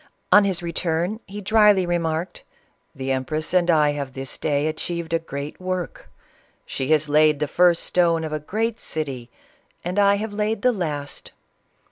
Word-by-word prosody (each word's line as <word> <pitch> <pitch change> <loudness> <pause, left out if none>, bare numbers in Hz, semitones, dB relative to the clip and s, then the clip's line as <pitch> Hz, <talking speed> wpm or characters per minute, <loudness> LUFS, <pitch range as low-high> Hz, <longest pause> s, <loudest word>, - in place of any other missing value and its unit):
On 205 -1 +7
his 185 -3 -1
return 170 +4 -1
he 205 +2 -7
dryly 210 -2 +4
re 175 0 0
marked, 165 +2 -3 0.3
" - - -44
The 135 0 -3
empress 155 +5 -2
and 180 -1 +3
I 150 -3 +4
have 140 -3 -5
this 135 0 -4
day 145 -1 0
achieved 165 +1 -3
a 165 - +3
great 145 0 -7
work; 185 -1 -4 0.6
she 130 - -4
has 155 0 +2
laid 150 0 +4
the 150 - 0
first 175 +2 +3
stone 170 -2 +2
of 155 -1 -4
a 155 - -1
great 220 +8 -2
city, 135 -6 -4 0.6
and 180 +3 -1
I 200 0 +5
have 210 +1 -4
laid 215 +3 -1
the 250 - +5
last!' 150 -9 -4
165 Hz, 175 wpm, -23 LUFS, 150-185 Hz, 0.6 s, On